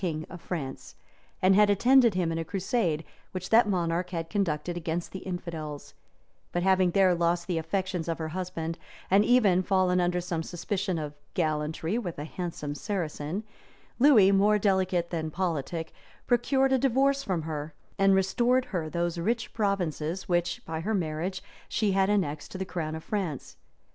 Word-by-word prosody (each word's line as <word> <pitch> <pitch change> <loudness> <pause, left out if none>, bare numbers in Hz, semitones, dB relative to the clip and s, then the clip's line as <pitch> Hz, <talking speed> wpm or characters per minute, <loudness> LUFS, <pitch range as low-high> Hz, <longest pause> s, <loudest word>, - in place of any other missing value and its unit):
king 160 -4 -2
of 175 - -9
France, 140 -7 -5 0.5
and 185 +1 +6
had 210 +1 +5
attended 240 +2 +5
him 175 -3 +1
in 165 - -2
a - - -1
crusade 185 -3 -1 0.3
which 185 0 -5
that 225 -1 +6
monarch 175 -1 0 0.2
conducted 175 -4 -1
against 170 0 -3
the 190 - -6
infidels; 165 -5 -6 0.6
but 175 - -1
having 190 -1 +4
there 185 0 +4
lost 170 0 +1
the 175 -3 -1
affections 180 +1 -2
of 165 - -1
her 160 -1 -4
husband, 165 -1 -4 0.3
and 200 +2 +6
even 210 -6 +4
fallen 185 -1 +2
under 175 0 +1
some 175 -2 -2
suspicion 185 +2 -2
of 150 -2 -4 0.2
gallantry 160 +4 -1
with 180 -8 -5
a 145 - -4
handsome 160 -3 -5
Saracen, 170 +1 -3 0.6
Lewis, 230 -8 +7
more 205 +2 +4
delicate 190 -4 +1
than 160 -2 -2
politic, 165 -1 -3 0.3
procured 265 +2 +2
a 260 - +3
divorce 275 +2 +2
from 185 - -2
her, 155 -1 -5 0.2
and 195 0 +5
restored 240 +7 +2
her 165 -4 -1
those 170 +1 -1
rich 225 +7 -1
provinces, 185 -5 -1
which, 175 -1 0
by 160 0 -4
her 210 +7 -1
marriage, 175 +2 -2 0.3
she 210 -2 +1
had 195 0 +2
annexed 160 -8 0
to - - -7
the 190 - -3
crown 165 -4 -4
of 160 - -7
France. 180 -10 -3
180 Hz, 165 wpm, -28 LUFS, 165-195 Hz, 0.6 s, Lewis